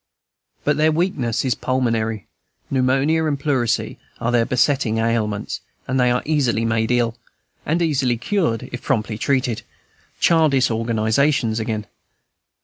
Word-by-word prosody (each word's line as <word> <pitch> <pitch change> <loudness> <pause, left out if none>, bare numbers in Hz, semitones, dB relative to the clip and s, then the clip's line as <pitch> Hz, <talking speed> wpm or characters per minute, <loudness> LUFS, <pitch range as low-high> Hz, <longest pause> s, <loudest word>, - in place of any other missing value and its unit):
But 150 0 +1
their 155 +1 +3
weakness 155 - 0
is 130 - +2
pulmonary; 115 -4 -1 0.5
pneumonia 135 +5 +2
and 145 -2 -1
pleurisy 130 -6 0 0.2
are 115 - -1
their 120 -1 +2
besetting 125 -2 +1
ailments; 110 -2 -1 0.3
they 130 -1 +2
are 125 0 +1
easily 130 -7 +1
made 110 0 0
ill, 120 -1 +1 0.5
and 170 +3 +1
easily 135 -6 +1
cured, 125 - -1
if 125 - -6
promptly 110 -4 -1
treated: 125 -4 0 0.6
childish 150 -7 +3
organizations 115 +2 +1
again. 110 -1 -3
125 Hz, 125 wpm, -21 LUFS, 115-140 Hz, 0.6 s, their